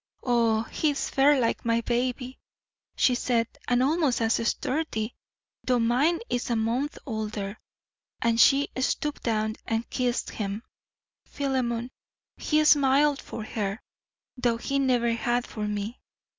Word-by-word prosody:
"Oh, 230 -3 +2
he 305 +6 0
is 285 - -2
fair 275 +1 +4
like 230 -2 0
my 230 0 +1
baby," 250 +2 -2 0.6
she 255 - +3
said, 235 -2 +1 0.2
"and 245 +1 +3
almost 295 -3 +2
as 225 -1 +2
sturdy, 245 -7 -1 0.5
though 250 -1 +2
mine 250 +9 +2
is 245 0 -2
a 235 - +1
month 235 +6 -1
older." 215 -3 -4 0.6
And 230 0 +3
she 280 +1 +5
stooped 295 +3 -1
down 220 -1 -1
and 225 +1 -1
kissed 250 -2 -1
him. 205 +1 -4 0.6
Philemon, 255 -3 -2 0.4
he 305 0 +1
smiled 285 0 +4
for 220 - -7
her, 210 -1 -3 0.6
though 240 -2 +1
he 275 +4 -1
never 245 -3 +2
had 240 +1 0
for 210 -1 -4
me. 210 +3 -4
240 Hz, 135 wpm, -27 LUFS, 225-270 Hz, 0.6 s, she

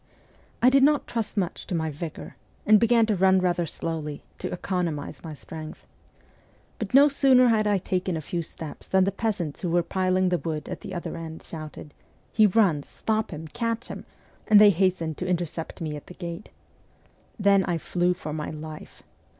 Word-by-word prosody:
I 250 - +7
did 275 0 +5
not 290 +1 +4
trust 225 -2 -3
much 185 -2 -2
to 180 - -2
my 160 -1 -1
vigour, 155 +2 -7 0.3
and 215 0 +7
began 230 0 +4
to 215 -1 +1
run 190 0 +4
rather 175 -2 0
slowly, 155 -2 -5 0.2
to - - -4
economize 175 -5 -3
my 160 -2 -7
strength. 155 +1 -9 0.9
But 215 +2 -2
no 280 +2 +8
sooner 265 -3 +5
had 215 -2 +2
I 205 -1 +3
taken 185 -1 -2
a - - -2
few 170 +3 -3
steps 160 -1 -8
than 190 0 +3
the 195 - +1
peasants 200 -8 -3
who 180 - -1
were 175 +1 +2
piling 185 0 +1
the 175 -1 +1
wood 155 -3 -4
at - - -6
the 190 - -7
other 175 - -4
end 165 -1 -7
shouted, 155 -2 -8 0.2
' - - -36
He 215 -2 +6
runs! 180 -8 +2
Stop 220 -1 -1
him! 160 -1 -7
Catch 230 +3 -3
him! - - -7 0.2
' - - -32
and 210 -1 +8
they 210 -1 +8
hastened 175 -4 0
to 185 - -3
intercept 170 -3 -3
me 155 -2 -3
at 145 - -10
the 180 - -11
gate. 170 +2 -7 0.9
Then 200 -2 +4
I 175 -2 0
flew 180 +2 0
for 155 -4 -6
my 150 -1 -4
life. 155 0 -9
180 Hz, 195 wpm, -26 LUFS, 160-210 Hz, 0.9 s, no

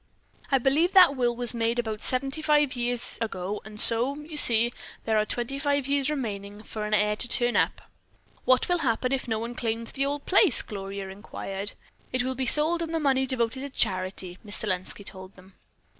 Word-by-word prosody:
"I 270 - +4
believe 280 +8 +1
that 365 -7 +6
will 240 -2 0
was 245 0 0
made 230 0 -1
about 220 -3 -3
seventy 270 +4 +1
five 295 -3 +1
years 245 0 0
ago 205 -2 -4
and 215 -1 -8
so, 240 +6 +7
you 300 +1 -10
see, 235 -4 +4 0.3
there 220 - 0
are 215 - -1
twenty 245 +3 -3
five 285 -1 -1
years 280 0 +1
remaining 205 -7 -5
for 215 -1 -6
an 210 0 0
heir 210 0 +1
to 240 - +2
turn 240 0 +2
up." - - 0 0.6
"What 255 0 +2
will 355 -1 0
happen 255 -3 -1
if 270 -2 -1
no 225 -2 -1
one 230 +2 -5
claims 230 -1 -3
the 275 0 -2
old 285 0 -4
place?" 370 - +6
Gloria 195 -1 -7
inquired. 195 0 -7 0.4
"It 255 -1 0
is - - -3
to 260 - -2
be 260 0 -4
sold 315 +6 +3
and 330 0 -4
the - - 0
money 265 -3 +1
devoted 245 0 -2
to 280 +1 -6
charity," 185 -5 -2
Miss 205 0 -2
Selenski 185 0 -3
told 190 0 -10
them. 185 +1 -18
240 Hz, 205 wpm, -25 LUFS, 210-275 Hz, 0.6 s, so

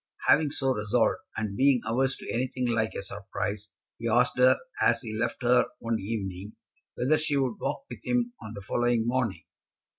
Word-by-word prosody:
Having 150 -1 +5
so 135 -2 0
resolved, 110 +1 +1 0.2
and 105 -2 -2
being 135 +2 +4
averse 130 +4 +1
to - - -6
anything 125 +1 -1
like 115 -2 0
a - - -4
surprise, 100 +1 -4 0.3
he 115 0 -2
asked 120 +3 +3
her, 130 +1 +6 0.2
as 115 0 +4
he 110 -2 -5
left 120 +3 -2
her 125 +1 +4
one 115 -1 -2
evening, 100 -1 -4 0.4
whether 150 +5 +2
she 155 -2 0
would 130 -4 0
walk 275 - -2
with - - -10
him 245 -1 0
on 110 0 -8
the 100 - -7
following 120 +1 +1
morning. 120 -7 -1
120 Hz, 180 wpm, -28 LUFS, 110-130 Hz, 0.4 s, her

